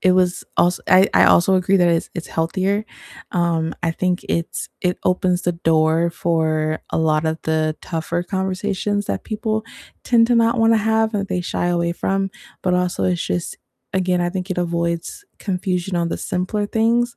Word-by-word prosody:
it 185 - +4
was 180 -1 +1
als 175 +1 +3
I 190 +1 +6
I - - +6
also 185 +2 +5
agree 185 +2 +2
that 175 -1 +4
it's 170 -1 +1
it's 170 - -6
healthier, 190 +6 0 0.5
um, 170 -2 0
I 165 - +1
think 180 +2 -1
it's 170 0 -2
it 180 0 0
opens 180 -1 +1
the 175 - +1
door 165 0 +2
for 155 -2 0
a - - -1
lot 155 -1 +2
of 160 0 -1
the 155 -1 0
tougher 170 +1 -2
conversations 190 +2 -2
that - - -3
people 220 0 -2 0.4
tend 230 -1 +4
to 240 - +4
not 230 +1 +3
wanna 225 0 +5
have, 220 +1 +1
and 200 -1 -1
they 180 - -1
shy 175 - -2
away 170 -1 +1
from, 195 +2 -1 0.3
but 180 -1 +1
also 180 0 0
it's 180 -2 0
just 175 - -3 0.4
again, 180 -1 +1
I 175 - +1
think 185 +1 -5
it 185 - -1
avoids 170 - -2
confusion 180 -1 -2
on 170 -1 0
the - - -3
simpler 205 +2 -2
things, 235 +3 +1
180 Hz, 180 wpm, -20 LUFS, 170-200 Hz, 0.5 s, I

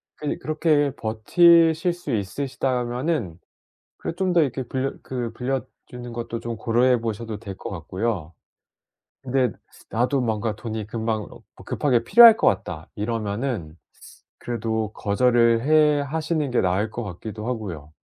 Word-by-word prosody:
그니 150 - -4
그렇게 155 -2 +1
버티실 165 - +4
수 175 -6 -5
있으시다면은 125 - -2 0.6
그 - - -5
좀 185 0 0
더 170 - +5
이렇게 135 -3 -1
빌려 130 +2 -2
그 120 -3 -4
빌려 130 +2 -2 0.2
주는 120 -1 -8
것도 115 0 -4
좀 115 0 -5
고려해 120 +1 +2
보셔도 110 -1 -4
될 100 -4 -7
것 - - -7
같고요. 95 -2 -3 0.9
근데 130 -2 +1 0.4
'나도 125 +4 +1
뭔가 110 -2 -1
돈이 110 -1 -5
금방 110 -2 -2 0.4
급하게 125 -5 +1
필요할 230 - +9
것 - - +2
같다.' 80 -2 -1
이러면은 105 - -3 0.6
그래도 110 -2 -3
거절을 115 +2 +3
해 150 -1 +4
하시는 155 0 -2
게 120 - +2
나을 95 +4 0
것 120 - -5
같기도 105 +3 -7
하고요. 90 - -5
120 Hz, 280 characters per minute, -23 LUFS, 110-140 Hz, 0.9 s, 필요할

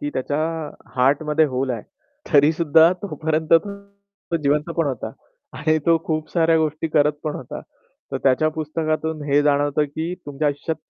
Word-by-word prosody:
की 295 0 -3
त्याच्या 145 +3 -2 0.6
हार्टमध्ये 150 +4 +3
होल 130 0 -2
आहे. 115 -4 -3 0.5
तरीसुद्धा 160 +3 +5
तोपर्यंत 160 -5 -2
तो 200 0 -3
जिवंत 150 +1 0
पण 165 -2 +1
होता. 120 -5 -4 0.5
आणि 155 +2 +2
तो 165 -1 +5
खूप 155 -1 -2
साऱ्या 165 -1 +3
गोष्टी 155 +1 -1
करत 150 0 +3
पण 150 - -2
होता. - - -7 0.5
तर - - 0
त्याच्या 135 +3 +3
पुस्तकातून 155 0 -2
हे 145 +1 +4
जाणवतं, 145 0 +2
की 160 +4 -4
तुमच्या 145 +1 -1
आयुष्यात 145 +3 -3
155 Hz, 150 wpm, -22 LUFS, 145-165 Hz, 0.6 s, तरीसुद्धा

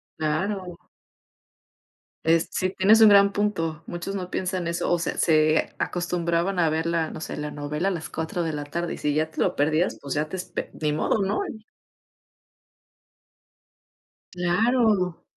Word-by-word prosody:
Claro. 180 +4 -2 1.5
Es 165 0 +2
sí 185 0 -1
tienes 210 +4 +5
un 220 - +9
gran 200 0 +6
punto, 165 -7 -1
muchos 175 +3 -5
no 180 -2 -4
piensan 185 -2 -2
eso, 170 +1 -1
o 175 - +2
sea, 170 - -3
se 155 -1 +3
acostumbraban 175 +1 -1
a 165 -2 +3
ver 160 +1 -1
la, 165 -1 0
no 155 - -8
sé, - - -5
la 150 0 -4
novela 150 +5 -3
a - - -1
las 165 -4 -5
4 160 +2 -3
de 160 -2 -2
la 145 0 -3
tarde 170 +4 -3
y - - -11
si 145 -1 -1
ya 155 +1 0
te - - -9
lo - - +1
perdías, 155 +4 +1
pues, 140 -2 -4
ya 150 +1 0
te 190 - -6
espe 180 - -5
ni 150 - +1
modo, 155 +7 +1
¿no? 195 - 0 2.9
Claro. 185 0 +1
170 Hz, 165 wpm, -25 LUFS, 155-185 Hz, 2.9 s, un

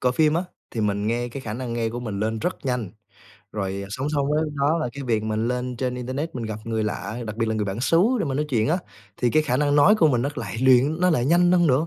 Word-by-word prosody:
coi 125 0 +2
phim 155 +2 +3
á, 170 - +1 0.3
thì 115 - -3
mình 100 0 0
nghe 120 +2 -1
cái 135 +3 -7
khả 110 -4 -5
năng 125 0 -4
nghe 115 -1 -1
của 120 +2 -5
mình 105 -4 -4
lên 110 +1 -1
rất 180 - -2
nhanh. 125 -7 -1 0.6
Rồi, 100 -1 -3
ờ, 100 - -8
song 130 +7 -3
song 140 -1 +1
với 155 +1 +2
đó 145 +4 +2
là 140 - -1
cái 140 - -7
việc 115 -4 0
mình 110 +2 -1
lên 125 0 -2
trên 125 0 -2
internet 130 +6 -4
mình 120 - -4
gặp 110 -1 -4
người 110 -1 -1
lạ, 105 +1 -4
đặc 110 -1 -5
biệt 115 0 0
là 110 - 0
người 110 -1 0
bản 100 +3 -3
xứ 165 +6 +4 0.2
để 210 - 0
mình 135 -3 -2
nói 150 +1 0
chuyện 115 -4 +1
á, 170 +4 +2 0.4
thì 120 - +1
cái 155 0 +3
khả 125 -4 0
năng 145 0 +2
nói 150 +9 +7
của 170 -7 +4
mình 125 -4 +1
nó 140 - 0
lại 125 - -5
luyện 130 +5 +4
nó 180 0 +4
lại 125 -6 +2
nhanh 175 +4 +4
hơn 175 -2 +4
nữa. 145 +4 +2
125 Hz, 295 wpm, -24 LUFS, 110-150 Hz, 0.6 s, nói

